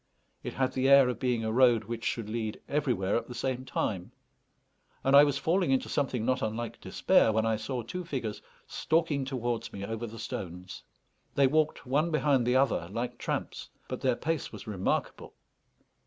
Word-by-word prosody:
It - - -6
had 130 -1 0
the 130 +1 +1
air 140 -2 +8
of 125 - -3
being 125 -3 0
a 110 - -1
road 120 -1 +4
which 115 -1 -6
should 110 -1 -2
lead 110 -1 -3
everywhere 125 -10 0
at - - -4
the 125 - -8
same 130 +1 -2
time; 95 -7 -3 0.9
and 135 +1 +4
I 140 - +10
was 145 -2 +1
falling 170 +3 +1
into 135 -1 +1
something 130 -5 -1
not 130 +1 +1
unlike 110 +2 -4
despair 110 - +3
when 110 +1 +1
I 110 0 +2
saw 115 +3 -4
two 180 +11 -5
figures 125 -10 -4 0.2
stalking 155 -4 0
towards 120 -3 -3
me 100 0 -6
over 115 +2 -4
the 115 +1 -9
stones. 90 -4 -6 0.5
They 140 - +5
walked 155 +3 +1
one 145 +6 +1
behind 145 -6 +2
the 125 - +3
other 130 -10 +2
like 120 +3 -4
tramps, - - -4 0.2
but - - -5
their 130 -2 +2
pace 160 +1 -2
was - - -9
remarkable. 100 -4 -2
125 Hz, 185 wpm, -29 LUFS, 110-140 Hz, 0.9 s, I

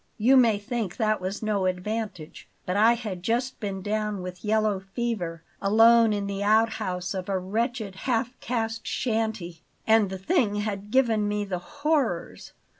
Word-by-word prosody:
You 245 +5 +5
may 235 -5 +5
think 215 -2 -4
that 215 -4 +1
was 195 +4 -4
no 205 -3 +1
advantage; 185 -2 -4 0.2
but 180 - -2
I 220 +3 +5
had 215 -7 -5
just 240 +6 -1
been 195 -3 -4
down 210 -2 -2
with 180 -1 -8
yellow 215 -2 +1
fever, 190 -5 -4 0.2
alone 225 +2 +6
in 205 -1 -1
the 200 0 -4
outhouse 205 -4 +1
of 185 0 -5
a 195 - +1
wretched 215 +2 -2 0.2
half 240 +1 +1
caste 225 -2 -3
shanty, 220 -8 -2 0.2
and 220 -3 +4
the 190 - -5
thing 220 - +1
had 205 -1 -3
given 225 -4 +2
me 205 0 -1
the 185 -3 -3
horrors. 285 - -2
210 Hz, 160 wpm, -26 LUFS, 190-230 Hz, 0.2 s, alone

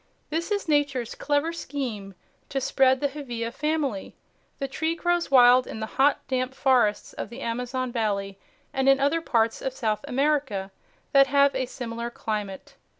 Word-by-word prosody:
This 330 +4 -2
is 405 -3 -1
Nature's 285 -6 +1
clever 295 +3 0
scheme 230 - -5 0.3
to 275 - -1
spread 265 0 +3
the 285 - +2
Hevea 240 -5 -5
family. 300 -8 -2 0.4
The 275 - -3
tree 320 +4 -2
grows 350 0 0
wild 250 -1 +6
in - - -6
the 220 - -2 0.2
hot, 285 +2 +3
damp 255 0 -1
forests 250 -7 +2
of - - -6
the 240 +4 -9
Amazon 250 +2 -3
valley 200 -4 -2 0.3
and 270 0 +2
in 270 0 +5
other 285 +4 +2
parts 230 -6 +1
of 265 - -3
South 220 -4 -1
America 270 -8 0 0.4
that 275 -1 +6
have 280 0 +4
a 260 -1 -1
similar 235 -2 -5
climate. 210 -4 -5
260 Hz, 160 wpm, -26 LUFS, 230-285 Hz, 0.4 s, wild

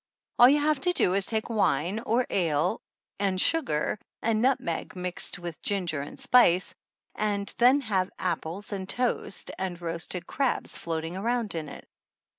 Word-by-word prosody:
All 245 - +9
you 290 +2 +4
have 295 -1 +1
to 360 - +3
do 180 - +2
is 195 0 +1
to - - 0
take 220 -1 -1
wine, 190 -3 +1
or 235 +2 +1
ale, 155 -5 +1 0.4
and 195 -2 0
sugar 215 - +2 0.2
and 220 -1 +1
nutmeg, 245 -12 0
mixed 180 -1 -3
with 175 -2 -7
ginger 175 -7 -1
and 145 - -9
spice, 190 -7 +4 0.4
then 215 +6 +2
have 195 -7 0
apples 180 +3 -3
and 190 -1 -5
toast 245 -5 -1
and 185 -2 -3
roasted 170 +1 -3
crabs 270 -2 -1
floating 165 +1 -4
around 230 +2 -1
in 160 -3 -4
it. - - -11
195 Hz, 155 wpm, -27 LUFS, 170-235 Hz, 0.4 s, All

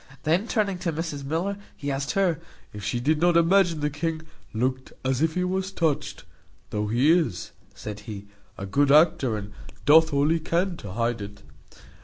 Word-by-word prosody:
Then 175 +8 +1
turning 200 -5 0
to 175 -2 -1
Mrs 155 -3 -4
Miller, 170 +8 -2 0.2
he 145 0 -3
asked 135 0 -2
her, 185 -5 +1 0.3
"If 105 -1 -8
she 120 +4 -1
did 150 +5 +1
not 175 -1 +4
imagine 170 -1 +3
the 150 0 0
king 160 +2 -3 0.3
looked 130 +3 -2
as 130 +1 0
if 160 0 +1
he 180 - +1
was 190 +1 -2
touched; 150 -6 -1 0.5
though 105 0 -1
he 125 +8 +3
is," 165 - 0 0.2
said 105 -1 -7
he, 105 -2 -8 0.3
"a 100 - -5
good 140 +8 +2
actor, 150 -6 +4
and 100 0 -8 0.3
doth 160 +2 +6
all 140 +1 +2
he 165 +1 +2
can 175 +3 0
to 100 - -8
hide 115 0 -1
it. 100 0 -9
150 Hz, 185 wpm, -25 LUFS, 120-170 Hz, 0.5 s, doth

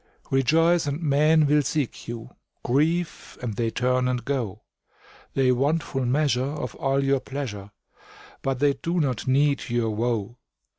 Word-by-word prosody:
Rejoice, 160 +5 +3
and 145 +2 -2
men 155 0 +4
will 150 +1 +4
seek 145 -2 -3
you; 115 +1 -7 0.3
Grieve, 160 +7 0
and 115 -4 -4
they 115 0 0
turn 125 +2 +1
and 125 -2 -2
go; 115 -7 -3 0.7
They 130 -2 +3
want 145 +6 +1
full 135 -2 -2
measure 135 -1 +2
of 135 -3 -4
all 135 0 +1
your 135 0 +2
pleasure, 120 -9 -6 0.7
But 135 -1 -1
they 140 +1 +3
do 170 +5 -2
not 130 -6 -1
need 140 +1 +2
your 120 -2 0
woe. 115 0 -2
135 Hz, 150 wpm, -25 LUFS, 120-145 Hz, 0.7 s, men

